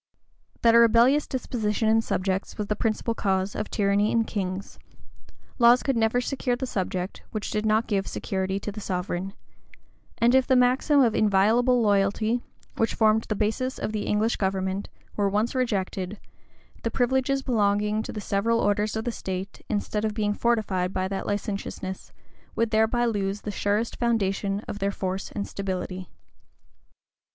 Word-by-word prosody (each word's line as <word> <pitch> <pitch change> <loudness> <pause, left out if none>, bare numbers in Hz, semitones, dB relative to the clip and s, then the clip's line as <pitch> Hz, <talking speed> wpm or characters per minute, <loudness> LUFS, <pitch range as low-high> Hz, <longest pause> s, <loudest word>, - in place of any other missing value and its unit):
That 230 -1 +6
a 235 - +7
rebellious 235 +5 +5
disposition 225 -4 -1
in 225 +1 +4
subjects 190 -2 -2
was 210 - -2
the 210 - -1
principal 225 +1 -1
cause 195 -2 0
of 210 - -3
tyranny 205 +1 +2
in 230 - +3
kings; 195 -2 -4 0.8
laws 240 +1 +6
could 270 - +1
never 225 +1 +2
secure 250 -1 -1
the 260 +2 -3
subject, 185 -4 -3
which 215 -2 -4
did 215 +1 -1
not 220 +1 +3
give 195 -2 -1
security 190 0 -2
to 210 - -4
the 215 +1 -8
sovereign; 185 0 -3 0.8
and 235 +1 +3
if 265 -1 +4
the 260 - +4
maxim 255 +4 +4
of 235 -4 +3
inviolable 225 +5 +3
loyalty, 205 +3 +2 0.4
which 225 - +1
formed 220 0 +3
the 215 - -2
basis 225 +6 -1
of - - -3
the 215 -1 -3
English 215 +2 +1
government, 190 0 -1 0.3
were 200 -1 +1
once 210 +4 0
rejected, 200 -5 -2 0.6
the 230 - -1
privileges 265 +3 +1
belonging 210 -3 +1
to - - -6
the 215 - -5
several 215 +4 +1
orders 210 +1 +1
of 220 +1 -3
the 240 - 0
state, 190 -2 -6
instead 210 0 -1
of 215 -1 -1
being 210 -2 0
fortified 205 -6 0
by 185 0 -1
that 195 0 -4
licentiousness, 200 -2 -4 0.4
would 230 -1 0
thereby 220 +2 +2
lose 205 -3 -1
the 210 - -4
surest 205 +3 -1
foundation 200 -4 0
of 205 - -7
their 200 0 0
force 190 -1 -4
and 200 - -3
stability. 185 -1 -4
210 Hz, 160 wpm, -26 LUFS, 195-230 Hz, 0.8 s, a